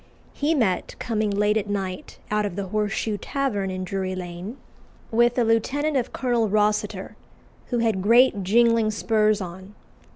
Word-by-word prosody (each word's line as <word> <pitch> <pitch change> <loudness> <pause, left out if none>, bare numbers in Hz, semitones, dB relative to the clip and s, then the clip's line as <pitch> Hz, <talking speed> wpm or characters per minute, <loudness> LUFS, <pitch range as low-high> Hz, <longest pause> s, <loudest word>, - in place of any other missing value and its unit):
He 300 +3 0
met, 205 - 0
coming 220 -3 -1
late 210 +1 +2
at 210 -1 -3
night 190 -2 -4
out 210 0 +1
of 200 -4 -3
the 195 -1 -4
Horseshoe 210 0 -1
Tavern 220 -9 -2
in 185 0 -4
Drury 185 0 -3
Lane, 180 +6 -7 0.5
with 240 +2 +3
a 245 - +4
lieutenant 270 +7 +1
of 255 -3 0
Colonel 240 -4 0
Rossiter, 210 +1 0 0.5
who 245 - -1
had 225 -5 +1
great 230 +1 +4
jingling 230 +3 +3
spurs 215 -1 +1
on. 190 +3 -8
210 Hz, 155 wpm, -24 LUFS, 195-235 Hz, 0.5 s, a